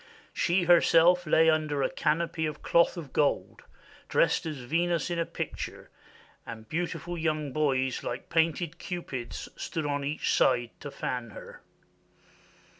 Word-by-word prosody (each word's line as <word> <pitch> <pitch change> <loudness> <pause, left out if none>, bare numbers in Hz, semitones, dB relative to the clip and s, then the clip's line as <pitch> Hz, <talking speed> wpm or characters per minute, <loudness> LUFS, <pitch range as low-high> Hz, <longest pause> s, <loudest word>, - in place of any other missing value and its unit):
She 180 +1 +1
herself 175 0 +5
lay 160 +1 +5
under 155 -3 +2
a - - +1
canopy 160 +1 0
of 155 - -7
cloth 170 +2 +3
of 155 -6 -8
gold, 145 -2 0 0.5
dressed - - +2
as 155 -2 -4
Venus 170 +7 -1
in 170 - -1
a 165 - -1
picture, - - -6 0.5
and 110 -1 -9
beautiful 175 +1 -3
young 155 -3 -1
boys, 130 -3 0
like 120 - -5
painted 165 0 0
Cupids, 130 - -5
stood 160 -2 -4
on 145 -1 -1
each 145 +2 -1
side 120 -2 +2
to 145 - -7
fan 125 -3 -4
her. 100 - -11
155 Hz, 140 wpm, -28 LUFS, 140-170 Hz, 0.5 s, herself